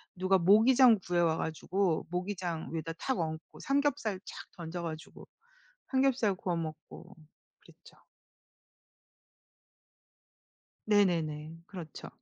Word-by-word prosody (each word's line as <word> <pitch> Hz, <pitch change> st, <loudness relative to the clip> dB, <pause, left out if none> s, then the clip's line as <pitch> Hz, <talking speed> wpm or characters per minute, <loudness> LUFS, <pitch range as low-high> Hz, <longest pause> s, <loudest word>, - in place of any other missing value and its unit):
누가 185 Hz, +1 st, +3 dB
모기장 225 Hz, +6 st, +6 dB
구해 175 Hz, 0 st, +1 dB
와 165 Hz, -2 st, +2 dB
가지고 165 Hz, +2 st, -1 dB
모기장 180 Hz, -2 st, -3 dB
위에다 165 Hz, 0 st, -3 dB
탁 260 Hz, +8 st, -2 dB
얹고 160 Hz, -1 st, -5 dB
삼겹살 275 Hz, -8 st, 0 dB
착 -, -, -9 dB
던져 170 Hz, 0 st, -6 dB
가지고 160 Hz, -1 st, -7 dB, 0.6 s
삼겹살 260 Hz, -6 st, +2 dB
구워 180 Hz, -2 st, -2 dB
먹고 160 Hz, +3 st, -7 dB, 0.5 s
그랬죠. -, -, -19 dB, 2.9 s
네네네. 165 Hz, -7 st, +1 dB
그렇죠. 170 Hz, -7 st, -9 dB
180 Hz, 220 characters per minute, -31 LUFS, 160-205 Hz, 2.9 s, 모기장